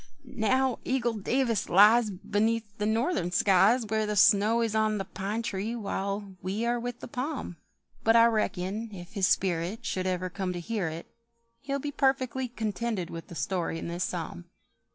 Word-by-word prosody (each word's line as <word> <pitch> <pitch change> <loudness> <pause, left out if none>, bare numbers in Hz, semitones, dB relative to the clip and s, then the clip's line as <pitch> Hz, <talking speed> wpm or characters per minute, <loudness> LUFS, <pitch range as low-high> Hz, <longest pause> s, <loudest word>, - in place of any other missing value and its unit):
Now 255 +1 +1
Eagle 245 -3 0
Davis 230 +1 0
lies 215 +4 +6
Beneath 210 +2 -1
the 210 - 0
Northern 225 - 0
skies, 195 +6 +4
Where 220 0 0
the 210 - -1
snow 210 +4 +5
is 225 -2 -1
on 215 -1 +2
the 195 - -3
pine 205 +5 -4
tree 220 +1 -3
while 200 -2 -3
we 195 +5 -2
are 240 0 +1
with 245 0 -5
the - - -7
palm; 255 - -4 0.5
But 225 +1 +4
I 230 0 +8
reckon 215 -1 -1
if 175 -1 -10
his 195 -3 +2
spirit 180 +3 0
Should 185 0 -1
ever 185 0 -2
come 185 -1 -3
to 175 - -4
hear 200 0 -2
it, 160 +1 -6 0.5
He'll 275 +1 -3
be 290 +1 -4
perfectly 265 -2 0
contented 220 -4 -3
with 165 0 -7
the 170 - -10
story 175 -2 -2
in 165 - -5
this 175 +1 -2
psalm. 165 - -4
215 Hz, 175 wpm, -28 LUFS, 185-235 Hz, 0.5 s, I